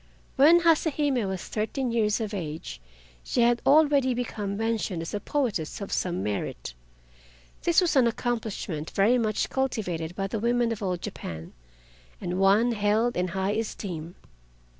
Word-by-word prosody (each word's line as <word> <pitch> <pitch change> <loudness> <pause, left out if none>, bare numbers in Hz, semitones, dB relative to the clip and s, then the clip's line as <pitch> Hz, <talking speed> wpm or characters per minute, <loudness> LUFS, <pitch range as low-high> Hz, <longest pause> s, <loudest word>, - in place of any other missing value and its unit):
When 325 +6 +6
Hase 330 -2 +4
Hime 270 -8 +1
was 190 -2 -4
thirteen 230 +4 -2
years 215 -2 +1
of 220 -2 -4
age, 155 - -5 0.4
she 245 - 0
had 240 0 +3
already 285 -3 +4
become 210 -5 -3
mentioned 220 -6 -1
as 165 - -7
a 205 - -1
poetess 225 - -2
of 200 - -6
some 180 0 -1
merit. 100 -12 -4 0.9
This 340 +1 +5
was 345 -4 +1
an 255 -3 +5
accomplishment 220 -10 -3
very 225 +6 +3
much 215 -2 -1
cultivated 180 -11 -2
by 195 - -2
the 210 +3 -3
women 235 +1 +1
of 225 - -4
old 180 -3 -2
Japan 80 0 -7 0.7
and 180 +1 -3
one 205 +5 +4
held 220 +2 +1
in 180 +1 0
high 190 +3 -1
esteem. 185 -6 -4
215 Hz, 155 wpm, -27 LUFS, 185-245 Hz, 0.9 s, When